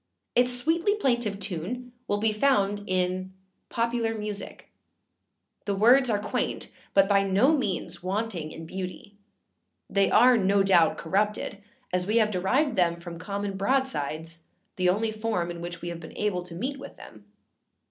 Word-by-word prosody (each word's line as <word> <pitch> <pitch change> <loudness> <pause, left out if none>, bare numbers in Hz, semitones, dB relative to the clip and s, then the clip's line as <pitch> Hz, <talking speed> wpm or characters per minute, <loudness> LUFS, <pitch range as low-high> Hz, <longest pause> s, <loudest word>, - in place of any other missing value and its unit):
Its 245 +1 +4
sweetly 325 +11 +3
plaintive 240 - 0
tune 205 +7 -4 0.2
will 205 - +1
be 215 +1 +1
found 205 -4 +2
in 185 0 -1 0.4
Popular 230 -1 -1
Music. 210 -1 -7 0.9
The 200 - 0
words 245 +6 +5
are 210 - +2
quaint, 210 +1 -3 0.2
but 195 0 +6
by 200 -1 +4
no 195 +10 +3
means 210 - -2
wanting 185 -4 -3
in 165 - -9
beauty; 185 +3 -7 0.7
they 200 -1 +2
are, 245 +1 +6
no 200 -1 +3
doubt, 175 -4 +4
corrupted, 205 +3 -1 0.3
as 180 0 0
we 215 +2 +2
have 215 -2 +3
derived 240 +10 +1
them 170 -2 +2
from 170 -1 -8
common 200 +1 -4
broadsides, 165 - -1 0.3
the 180 -1 +2
only 220 +4 +1
form 215 -6 -2
in 170 0 -8
which 175 0 -7
we 175 - -3
have 170 -1 -6
been 160 - -11
able 205 -4 0
to 175 -2 -7
meet 270 +9 -3
with 275 - -10
them. - - -14
200 Hz, 160 wpm, -27 LUFS, 180-230 Hz, 0.9 s, but